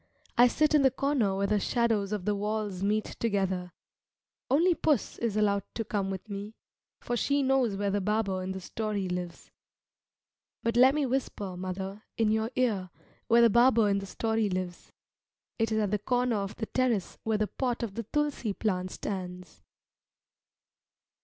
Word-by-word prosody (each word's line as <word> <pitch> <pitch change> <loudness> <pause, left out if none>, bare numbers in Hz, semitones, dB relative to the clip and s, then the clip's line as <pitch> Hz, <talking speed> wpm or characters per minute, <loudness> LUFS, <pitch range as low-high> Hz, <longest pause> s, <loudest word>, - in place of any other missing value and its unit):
I 245 +1 +7
sit 305 +5 +2
in 300 - +6
the 270 - +6
corner 260 -7 0
where 200 - +1
the 210 +1 +2
shadows 220 -2 +1
of 205 -4 -3
the 210 - +2
walls 205 -2 -2
meet 210 +2 +1 0.2
together. 190 -5 -1 0.8
Only 335 +7 +4
puss 300 -7 0
is 225 -3 -1
allowed 200 -1 +2
to 225 - -2
come 200 -3 -1
with 190 +1 -5
me, 205 +1 -6 0.4
for 240 - -3
she 280 +4 +1
knows 260 -5 +2
where 200 0 -1
the 205 0 0
barber 200 -2 0
in 185 +1 -3
the 190 0 -5
story 210 0 -3
lives. 180 -1 -5 1.1
But 230 0 0
let 260 +3 +6
me 300 -2 +1
whisper, 240 -7 -2
mother, 190 +2 -5 0.2
in 225 -2 +2
your 220 +1 +1
ear 210 -8 0 0.4
where 235 +1 +6
the 235 - +7
barber 235 -1 +5
in 200 0 +2
the 195 - -7
story 220 0 0
lives. 180 -2 -4 0.7
It 225 0 +1
is 220 - +1
at 210 -2 +1
the 210 - +1
corner 245 +1 +1
of 195 0 -3
the 220 - -3
terrace 240 -6 -1
where 220 -1 0
the 215 - +1
pot 245 +2 -2
of 220 -4 -3
the 230 - -3
tulsi 280 -2 -1
plant 185 -3 -1
stands. 180 -3 -6
215 Hz, 175 wpm, -29 LUFS, 195-235 Hz, 1.1 s, I